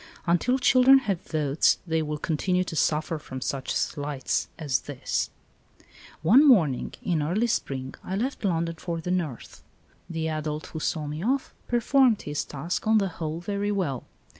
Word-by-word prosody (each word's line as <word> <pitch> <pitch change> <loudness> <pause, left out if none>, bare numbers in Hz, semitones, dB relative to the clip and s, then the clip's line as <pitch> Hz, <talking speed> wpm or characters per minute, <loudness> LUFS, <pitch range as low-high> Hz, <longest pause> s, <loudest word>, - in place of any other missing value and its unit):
Until 175 +10 +2
children 260 +1 +6
have 205 -9 -1
votes 150 -2 +2
they 160 -2 0
will 150 -1 -3
continue 180 +4 0
to 170 - -6
suffer 155 +1 +1
from 130 -2 -7
such 130 +1 -3
slights 145 -3 -1
as 140 -6 0
this! 145 -3 -3 0.9
One 230 - +7
morning 165 - +3
in 170 -4 0
early 180 +10 +1
spring 135 - -2
I 190 - -3
left 250 +6 -2
London 165 -3 0
for 170 -2 -3
the 180 +2 -3
north. 165 -9 -3 0.5
The 160 -1 -2
adult 155 -1 -3
who 160 - -3
saw 155 0 -1
me 150 +3 -5
off 260 +4 0
performed 245 -1 +3
his 145 0 -2
task 155 +8 -4
on 220 0 +5
the 195 -2 +1
whole 165 -1 -5
very 205 +2 -2
well. 165 -11 -2
165 Hz, 165 wpm, -26 LUFS, 150-205 Hz, 0.9 s, One